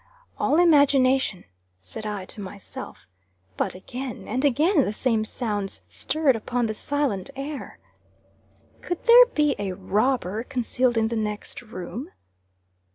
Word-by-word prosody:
"All 295 - +2
imagination," 270 - +4 0.4
said 95 - -7
I 205 -3 -4
to 205 - -5
myself. 200 0 -9 0.5
But - - -2
again 245 +5 -7
and 255 +5 -1
again 295 +4 +3
the 205 - -2
same 225 -1 +1
sounds 205 - -3
stirred 265 - +1
upon 240 +2 -1
the 215 - -1
silent 275 -4 -1
air. 280 +1 -6 1.0
"Could 350 -1 -4
there 485 +1 +9
be 300 - +1
a 195 -2 -2
robber 210 +2 0
concealed 250 -1 0
in 225 0 +2
the 230 - -2
next 210 0 -3
room?" 230 - -7
240 Hz, 130 wpm, -25 LUFS, 205-280 Hz, 1.0 s, there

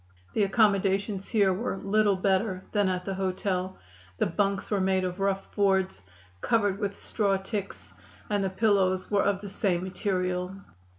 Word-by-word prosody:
The - - +1
accommodations 200 -1 +2
here 200 -4 +3
were 195 +1 -2
little 205 +1 +2
better 190 0 0
than 205 -3 +2
at 180 -1 -2
the 195 - -2
hotel. 185 0 -2 0.4
The - - +2
bunks 200 +3 -1
were 200 -2 +2
made 190 0 +2
of 180 +1 -3
rough 195 0 -1
boards, 190 - +1 0.4
covered 205 -4 +1
with 200 -1 -2
straw 200 -3 0
ticks, 200 +1 -6 0.3
and 205 -1 0
the 190 - 0
pillows 190 -2 +1
were 200 -1 +3
of 200 -1 +1
the 205 - -7
same 190 -3 0
material. 185 -1 -2
195 Hz, 160 wpm, -28 LUFS, 185-205 Hz, 0.4 s, here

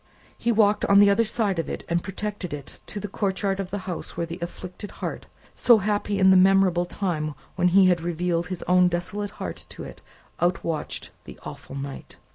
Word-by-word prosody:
He 235 - 0
walked 210 -2 +3
on 200 - +5
the 200 0 +7
other 230 +3 +3
side 210 -4 0
of 165 - -2
it - - -5
and 170 0 +1
protected 195 -4 -4
it 145 -1 -10
to 210 - -5
the 205 - -4
courtyard 195 0 -1
of 190 -2 -3
the 205 - -3
house 180 -3 -5
where 170 - 0
the 170 +2 -7
afflicted 180 +3 -7
heart - - -6 0.3
so 240 -2 +5
happy 205 0 -1
in 190 -1 +6
the - - +7
memorable 185 -2 +4
time 155 -7 -2 0.2
when 180 0 +3
he 190 +2 +6
had 180 -2 +3
revealed 170 0 -1
his 185 -1 -5
own 180 0 +4
desolate 180 +4 -2
heart - - -6
to - - -8
it - - -10 0.4
outwatched 170 -3 -1
the - - -11
awful - - -9
night. 140 0 -7
185 Hz, 200 wpm, -25 LUFS, 175-200 Hz, 0.4 s, the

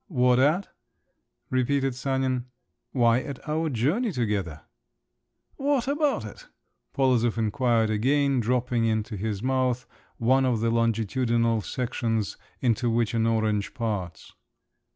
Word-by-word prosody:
"What 125 - +3
at?" 155 +9 +2 0.8
repeated 135 +1 +1
Sanin. 130 -1 -1 0.4
"Why, 120 -2 +3
at 140 +2 -8
our 160 +1 0
journey 155 - 0
together." 100 - -2 1.0
"What 275 -2 0
about 290 +1 0
it?" - - -11 0.4
Polozov 125 -4 +2
inquired 115 0 +1
again, 135 +5 +2
dropping 120 0 0
into 110 0 -1
his 105 +1 -3
mouth 130 -1 0 0.3
one 130 +3 +3
of 125 -4 +1
the 115 +1 +1
longitudinal 115 0 +1
sections 115 -4 -2 0.3
into 120 -1 +1
which 115 -1 +1
an 115 -1 +1
orange 110 -2 0
parts. 100 -9 -4
120 Hz, 115 wpm, -26 LUFS, 115-135 Hz, 1.0 s, What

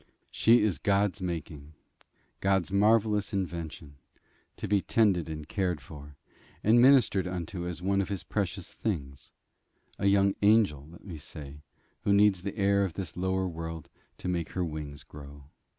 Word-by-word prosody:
She 115 0 +4
is 95 -10 0
God's 100 0 +1
making; 80 -4 -5 0.7
God's 95 -1 +1
marvellous 105 0 +2
invention, 85 -6 -5 0.6
to - - -4
be 100 -1 +2
tended 90 -3 +2
and 75 -1 -6
cared 90 -4 -1
for, 70 +1 -12 0.5
and 115 +3 +5
ministered 120 -8 +5
unto 90 0 -4
as 90 0 -6
one 100 +1 +2
of 95 - -4
his 100 -3 -4
precious 95 -3 -3
things; 70 - -4 0.7
a 100 - +1
young 100 0 +4
angel, 100 -9 +3
let 85 - -15
me 85 -6 -7
say, 70 0 -10 0.4
who 100 - +2
needs 100 -2 +4
the 100 +3 -5
air 100 0 +3
of 95 -4 -2
this 95 -5 -6
lower 95 +1 0
world 80 -2 -6 0.3
to - - -6
make 85 -3 -2
her 90 -1 -1
wings 75 -3 -6
grow. 70 -1 -13
90 Hz, 155 wpm, -29 LUFS, 80-100 Hz, 0.7 s, and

